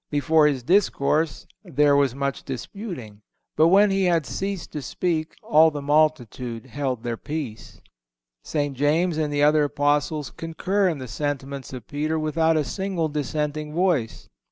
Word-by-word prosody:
Before 150 +2 +3
his 135 -4 -1
discourse 160 - +1 0.2
"there 150 -5 +3
was 140 -3 +2
much 140 -1 -2
disputing." 130 - -7 0.3
But 160 - +5
when 200 +3 +5
he 195 -1 +2
had 170 -4 +2
ceased 195 -1 -4
to 150 - -5
speak 160 +3 -2
"all 160 +1 +5
the 150 -2 -5
multitude 135 -6 0
held 130 -2 -3
their 120 -1 -3
peace."(164) 140 -7 -6 0.7
St. 145 -3 -2
James 155 +5 +1
and 150 -1 0
the 145 0 +1
other 150 0 +4
Apostles 145 +1 0
concur 185 +4 -1
in 160 - -2
the 130 -2 -7
sentiments 140 +2 -4
of 130 -2 -8
Peter 155 +2 -2
without 160 +1 +1
a 155 - +2
single 175 +3 -2
dissenting 150 +1 -3
voice. 170 -11 0
150 Hz, 155 wpm, -24 LUFS, 140-160 Hz, 0.7 s, But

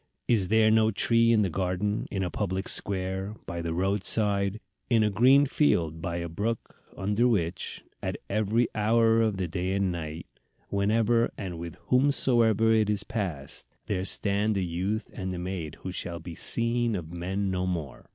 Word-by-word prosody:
Is 105 -6 +3
there 110 +1 +4
no 110 0 +4
tree 115 +2 +3
in 110 -2 +4
the 95 - 0
garden, 95 +4 -1
in 95 -1 -2
a 90 - -3
public 95 +2 -2
square, 95 +1 -1
by 85 0 -4
the 85 -1 -3
road 95 +3 0
side, 100 -1 +1 0.3
in 115 -3 +4
a 105 - +1
green 130 +7 +5
field 85 - +1
by 85 0 -3
a 85 0 -3
brook, 105 +7 -3 0.2
under 105 +5 +1
which, 95 -5 -1 0.2
at - - -3
every 110 +3 +1
hour 115 +1 +3
of 110 -3 +1
the 95 -2 -1
day 90 +2 -2
and 100 -1 +1
night, 80 -1 -5 0.4
whenever 110 +3 +2
and 90 -4 -5
with 85 -1 -7
whomsoever 120 -5 +3
it 110 -2 +2
is 105 -1 0
passed, 90 -13 -3 0.2
there 95 -3 -1
stand 100 +2 +1
a 95 - 0
youth 95 +6 -2
and 95 -2 -4
maid 90 -5 -4
who 95 - -5
shall 85 -1 -5
be 85 +1 -8
seen 115 +4 +1
of 85 -3 -6
men 95 +3 -2
no 90 0 -1
more. 80 -7 -5
100 Hz, 175 wpm, -27 LUFS, 90-110 Hz, 0.4 s, green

